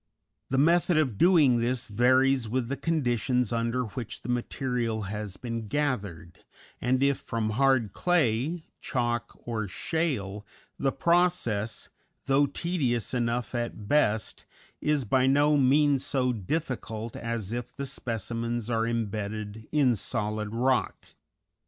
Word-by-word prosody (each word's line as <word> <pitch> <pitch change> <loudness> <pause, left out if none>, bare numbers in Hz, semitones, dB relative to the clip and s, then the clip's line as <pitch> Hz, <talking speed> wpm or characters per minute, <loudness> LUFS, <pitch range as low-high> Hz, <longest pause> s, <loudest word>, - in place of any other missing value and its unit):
The 135 - 0
method 170 +3 +4
of 130 -10 +1
doing 155 -9 +5
this 120 +1 -1
varies 130 +2 +3
with 125 0 -1
the 140 - -1
conditions 125 -5 0
under 115 +2 0
which 115 0 -6
the - - -7
material 120 -2 -1
has 105 0 -5
been 115 -3 -5
gathered, 100 - -2 0.4
and 130 +2 +2
if 140 -1 +2
from 110 -2 -2
hard 125 -4 +2
clay, 160 -1 +1
chalk, 120 -1 -2
or 110 -3 -2
shale, 105 - -2 0.4
the 135 - +1
process, 130 - +1 0.4
though 140 +1 +3
tedious 140 - -1
enough 120 0 -1
at 120 -4 -4
best, 110 -6 +1 0.4
is 150 -3 +1
by 130 +4 +3
no 145 +2 +4
means 140 0 +4
so 125 -2 +1
difficult 115 - -3
as 115 -3 -3
if 120 0 -4
the 140 - -4
specimens 115 -1 -3
are 115 0 +1
imbedded 110 -1 -3
in 140 -5 +3
solid 105 -1 -2
rock. 125 +3 0
120 Hz, 125 wpm, -28 LUFS, 110-135 Hz, 0.4 s, doing